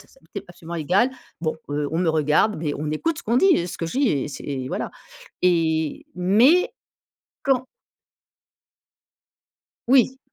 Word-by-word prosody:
ça, - - -18
ça - - -23
m'était - - -8
absolument 170 -1 -9
égal. 185 - +2 0.3
Bon 160 -1 -1
heu, 145 0 -1
on 165 - 0
me 180 - +1
regarde, 155 +7 +2
mais 155 -2 -2
on 150 0 -3
écoute 320 - -1
ce - - -8
qu'on 230 +3 +1
dit, 380 - +5
heu, 175 - -4
ce - - -6
que 165 - -2
je 210 +11 -3
dis 280 - +3
et 145 0 -1
c'est 140 - -8
et 130 -3 -4
voilà - - -3 0.5
et 160 -3 +1
mais 220 - +4 0.7
quand 260 -2 +1 2.2
Oui. 260 0 +4
175 Hz, 170 wpm, -23 LUFS, 155-250 Hz, 2.2 s, dit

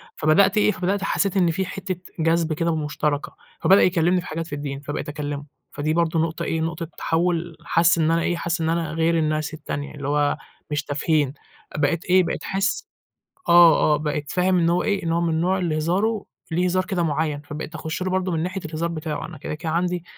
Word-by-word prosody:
فبدأت 190 +7 +4
إيه 210 0 +4
فبدأت 195 +1 -1
حسّيت 195 0 0
إن 175 -3 +4
في 190 +4 -1
حتّة 190 0 -4 0.2
جذب 165 0 +2
كده 165 +1 0
مشتركة، 150 -1 -2 0.3
فبدأ 195 +1 +6
يكلمني 180 0 +3
في - - -10
حاجات 165 +1 -4
في 145 - -5
الدين 140 -1 -4
فبقيت 145 +1 -5
أكلمه، 145 -1 -4 0.3
فدي 155 +1 -1
برضه 165 0 +1
نقطة 165 +1 -1
إيه 160 0 -1
نقطة 165 0 -3
تحول، 170 0 0
حس 170 +1 +4
إن 160 0 +2
أنا 165 - +2
إيه 175 - 0
حس 170 0 -2
إن 160 - +1
أنا 165 -2 -1
غير 165 +1 +2
الناس 155 -1 0
التانية 145 -2 -5
اللي 140 -2 -5
هو 145 0 +1 0.3
مش 150 0 0
تافهين، 145 -1 0 0.4
بقيت 150 +3 0
إيه، 185 0 +5
بقيت - - -3
أحس 195 0 -1 0.6
آه 170 -3 +7
آه - - +3
بقيت 150 -1 -3
فاهم 180 0 +2
إن 170 -1 +3
هو 175 - +2
إيه 200 -2 0
إن 165 - 0
هو 170 - +1
من 170 -1 +1
النوع 180 +4 +1
اللي 165 -4 0
هزاره 195 +7 0 0.3
ليه 175 +3 +1
هزار 185 +1 +1
كده 185 -2 -1
مُعيّن، 150 -2 -1
فبقيت 150 +2 -7
أخش 160 +2 -4
له 185 - -1
برضه 185 0 0
من 160 -1 0
ناحية 185 +3 -3
الهزار 160 +1 -2
بتاعه، 155 -3 -4
أنا 160 -2 -10
كده 150 - -5
كده 160 +1 -4
عندي 175 0 0
165 Hz, 210 wpm, -23 LUFS, 155-180 Hz, 0.6 s, آه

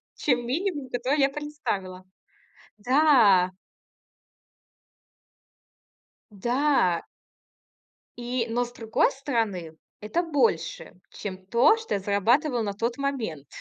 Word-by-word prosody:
чем 245 -4 0
минимум, 290 0 -2
который 255 +5 0
я 275 0 +4
представила. 270 -11 -5 0.8
Да. 235 -7 +4 2.8
Да. 240 - +1 1.2
И 240 0 -2
Но 240 +2 +1
с 240 - -14
другой 225 +1 +1
стороны, 225 - -3 0.2
это 215 +12 -1
больше, 335 +7 0 0.2
чем 190 -2 -8
то, 235 - +4
что 450 - -4
я 200 - -1
зарабатывала 235 - +1
на 200 -2 -3
тот 230 +5 -2
момент. 235 - -3
240 Hz, 95 wpm, -26 LUFS, 200-280 Hz, 2.8 s, я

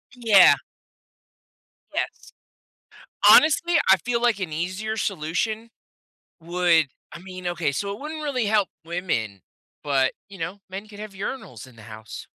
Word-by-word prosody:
Yeah. 215 -6 +7 1.4
Yes. - - -4 1.0
Honestly, 335 +2 +6
I 190 - +8
feel, 235 -1 -1
like, 235 -4 +2
an 175 -5 -4
easier 185 +7 -3
solution 210 +6 -2 0.7
would 170 -2 +2 0.3
I 170 - -9
mean, 185 -1 -9
okay. 175 -4 -1
So, 200 +8 -3
it 205 - -9
wouldn't 310 +1 -6
really 255 -7 -1
help 205 -3 +2 0.2
women, 160 - -3 0.4
but, 135 -2 +1 0.2
you 195 - -12
know, 180 +4 -5
men 195 +3 -7
could 205 -1 -13
have 215 -1 -8
urinals 190 - -6
in 125 - -17
the 110 - -14
house. 110 -1 -10
190 Hz, 140 wpm, -24 LUFS, 160-220 Hz, 1.4 s, I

